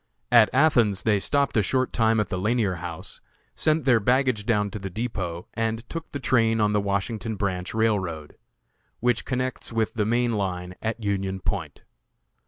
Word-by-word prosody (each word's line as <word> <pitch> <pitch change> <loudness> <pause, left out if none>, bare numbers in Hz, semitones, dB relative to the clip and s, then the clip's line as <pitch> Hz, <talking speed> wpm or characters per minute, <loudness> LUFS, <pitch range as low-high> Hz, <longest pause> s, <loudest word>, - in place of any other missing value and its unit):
At 115 -4 +7
Athens 120 -8 +3
they 105 -2 +3
stopped 140 +6 +1
a 110 - +4
short 130 +6 0
time 110 -1 +3
at 105 - -1
the 90 - -2
Lanier 105 -2 +1
House; 85 -2 -7 0.3
sent 155 -2 +1
their 125 -4 +5
baggage 125 -1 +1
down 105 -3 +1
to 105 - -5
the 95 0 -5
depot, 90 -5 -4
and 115 0 -2
took 165 -1 -6
the 140 - -4
train 115 -3 +2
on 105 -1 +2
the 105 - +2
Washington 105 +3 -2
Branch 95 -3 -2
Railroad, 95 -9 -1 0.6
which 120 -1 +1
connects 130 -1 -3
with 115 -1 0
the 105 -2 0
main 120 +1 +1
line 90 -3 -3
at 115 0 -3
Union 95 -1 -1
Point. 85 -7 -4
110 Hz, 175 wpm, -25 LUFS, 95-120 Hz, 0.6 s, At